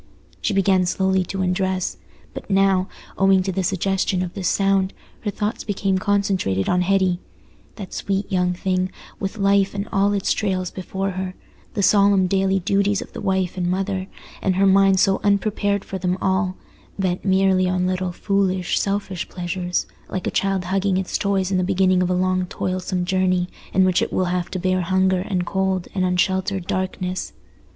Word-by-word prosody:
She 210 - 0
began 190 -2 +3
slowly 190 +1 +1
to 190 +1 -3
undress; 185 0 -1 0.4
but - - -8
now, 195 -1 +3 0.3
owing 195 -1 +4
to 190 - -1
the 190 - -1
suggestions 190 0 0
of 175 - -5
this 190 -4 -2
sound, 195 -1 +2 0.3
her 210 - -3
thoughts 210 +2 -3
became 195 -2 0
concentrated 190 - 0
on 180 0 +2
Hetty—that 190 +1 -3
sweet 200 +1 -2
young 180 -1 +1
thing, 185 0 -1 0.3
with 195 +2 -4
life 200 -1 +2
and 200 +1 -3
all 200 +1 +2
its 200 -2 +1
trials 185 -3 -1
before 195 +1 -3
her—the 185 +2 -6
solemn 200 -1 +5
daily 195 +1 +2
duties 200 +2 +1
of - - -18
the - - -6
wife 190 -1 0
and 180 -1 0
mother—and 190 0 -3
her 195 +1 +3
mind 195 0 +5
so 195 -1 +3
unprepared 205 0 +1
for 190 - -5
them 180 0 0
all, 190 0 0 0.4
bent 185 -2 -1
merely 190 -1 +3
on 180 0 0
little 185 0 -1
foolish, 190 -1 0
selfish 195 -2 -2
pleasures, 180 0 -2 0.2
like 185 - -4
a - - -1
child 195 -2 0
hugging 190 +1 +1
its 190 -1 -2
toys 195 -2 0
in 185 - +2
the - - +1
beginning 185 0 +2
of 180 - +1
a 180 - +1
long 185 0 +1
toilsome 185 0 -2
journey 185 -1 +1 0.2
in 190 0 +4
which 185 -1 +2
it - - -1
will 185 - +1
have 180 -1 -2
to - - -4
bear 185 0 +1
hunger 185 +1 +2
and 185 -2 -2
cold 190 -1 -1
and 185 - 0
unsheltered 185 +1 0
darkness. 185 0 -3
190 Hz, 175 wpm, -22 LUFS, 185-195 Hz, 0.4 s, solemn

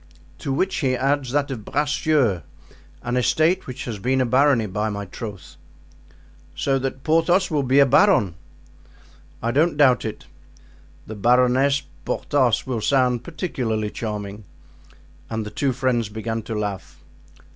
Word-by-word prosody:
"To 140 - -4
which 185 +8 0
he 130 -3 +1
adds 135 0 0
that 145 0 0
of 115 -5 -5
Bracieux, 145 - +1 0.6
an 125 +1 -1
estate 155 +8 +2
which 125 0 -6
has 110 -4 -5
been 130 +6 +1
a 130 - +2
barony, 130 -1 +3
by 105 +2 -2
my 100 -1 -4
troth." 100 +1 -9 1.0
"So 135 -1 0
that 135 0 -4
Porthos 165 +4 +2
will 150 -2 +1
be 130 +1 +1
a 140 - +7
baron." 135 - +4 1.1
"I 115 - +1
don't 155 +4 +2
doubt 130 -4 +4
it. 110 - -6 0.8
The 110 - -7
'Baroness 125 +5 +3 0.2
Porthos' 130 -6 +1
will 125 -4 -3
sound 125 -1 +2
particularly 120 - -3
charming." 105 -2 -5 0.8
And 110 -1 -3
the 105 - -7
two 140 -2 0
friends 125 -3 0
began 110 +1 -4
to 110 - -2
laugh. 100 -3 -5
125 Hz, 145 wpm, -22 LUFS, 110-140 Hz, 1.1 s, a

